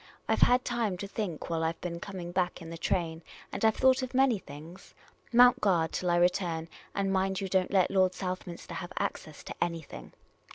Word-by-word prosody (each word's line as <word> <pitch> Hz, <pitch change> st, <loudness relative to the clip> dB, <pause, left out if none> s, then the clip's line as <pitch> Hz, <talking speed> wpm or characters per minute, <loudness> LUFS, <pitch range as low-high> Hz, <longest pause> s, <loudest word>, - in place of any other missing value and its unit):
I -, -, +3 dB
've -, -, -5 dB
had 250 Hz, +1 st, +5 dB
time 230 Hz, -6 st, -1 dB
to 200 Hz, -, -5 dB
think 195 Hz, -6 st, -4 dB
while 165 Hz, -1 st, 0 dB
I 160 Hz, +1 st, +1 dB
've -, -, -32 dB
been 170 Hz, -1 st, -4 dB
coming 180 Hz, -2 st, -6 dB
back 180 Hz, 0 st, -1 dB
in 165 Hz, -2 st, -9 dB
the 165 Hz, -, -6 dB
train, 165 Hz, -2 st, -1 dB, 0.3 s
and -, -, -5 dB
I 220 Hz, -, +7 dB
've 220 Hz, -, -3 dB
thought 260 Hz, 0 st, +4 dB
of 255 Hz, 0 st, -5 dB
many 260 Hz, -5 st, +4 dB
things. 155 Hz, +4 st, -12 dB, 0.4 s
Mount 245 Hz, +1 st, +6 dB
guard 170 Hz, -5 st, +2 dB
till 180 Hz, -, -2 dB
I 175 Hz, -, +3 dB
return, 175 Hz, -2 st, +1 dB, 0.3 s
and 195 Hz, -1 st, 0 dB
mind 190 Hz, 0 st, +1 dB
you 195 Hz, -, -3 dB
don't 185 Hz, -1 st, +1 dB
let 190 Hz, -3 st, +3 dB
Lord 185 Hz, -1 st, +3 dB
Southminster 185 Hz, -2 st, -5 dB
have 175 Hz, 0 st, -6 dB
access 155 Hz, -2 st, -4 dB
to -, -, -7 dB
anything." 165 Hz, -3 st, -6 dB
185 Hz, 215 wpm, -30 LUFS, 170-200 Hz, 0.4 s, I